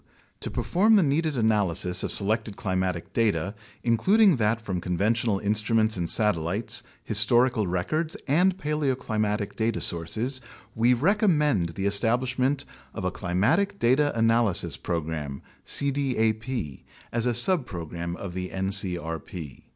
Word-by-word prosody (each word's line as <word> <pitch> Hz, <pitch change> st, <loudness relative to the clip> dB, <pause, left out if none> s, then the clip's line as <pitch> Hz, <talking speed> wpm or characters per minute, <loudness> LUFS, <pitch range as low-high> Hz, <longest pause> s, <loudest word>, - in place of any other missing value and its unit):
To -, -, -3 dB
perform 210 Hz, +5 st, +2 dB
the 200 Hz, -, +5 dB
needed 150 Hz, 0 st, 0 dB
analysis 95 Hz, -5 st, +1 dB
of -, -, -2 dB
selected 110 Hz, +1 st, +1 dB
climatic 95 Hz, -3 st, -3 dB
data, 100 Hz, -4 st, 0 dB, 0.3 s
includ 125 Hz, -, +2 dB
ing 200 Hz, -7 st, +6 dB
that 110 Hz, 0 st, +1 dB
from 95 Hz, -6 st, -4 dB
conventional 105 Hz, +5 st, 0 dB
instruments 110 Hz, +2 st, +1 dB
and 85 Hz, -3 st, -3 dB
satellites, 105 Hz, -1 st, 0 dB, 0.2 s
historical 120 Hz, -3 st, +3 dB
records, 155 Hz, -, -2 dB
and 180 Hz, +6 st, +3 dB
paleoclimatic 125 Hz, -, -2 dB
data 110 Hz, 0 st, -1 dB
sources, 110 Hz, -, -2 dB, 0.3 s
we 120 Hz, +3 st, +3 dB
recommend 150 Hz, -, +1 dB
the 95 Hz, -, -3 dB
establishment 125 Hz, +6 st, +1 dB, 0.3 s
of 95 Hz, -, -4 dB
a 90 Hz, -, 0 dB
Climatic 105 Hz, -, 0 dB
Data 145 Hz, +3 st, +2 dB
Analysis 115 Hz, -4 st, +3 dB
Program 80 Hz, -5 st, -4 dB, 0.2 s
(cdap) 125 Hz, -, -1 dB, 0.3 s
as 115 Hz, +1 st, -1 dB
a 120 Hz, -, +2 dB
subprogram 90 Hz, -, 0 dB
of 95 Hz, -1 st, -7 dB
the 90 Hz, 0 st, -4 dB
ncrp. 90 Hz, -5 st, -3 dB
110 Hz, 120 wpm, -26 LUFS, 95-130 Hz, 0.3 s, ing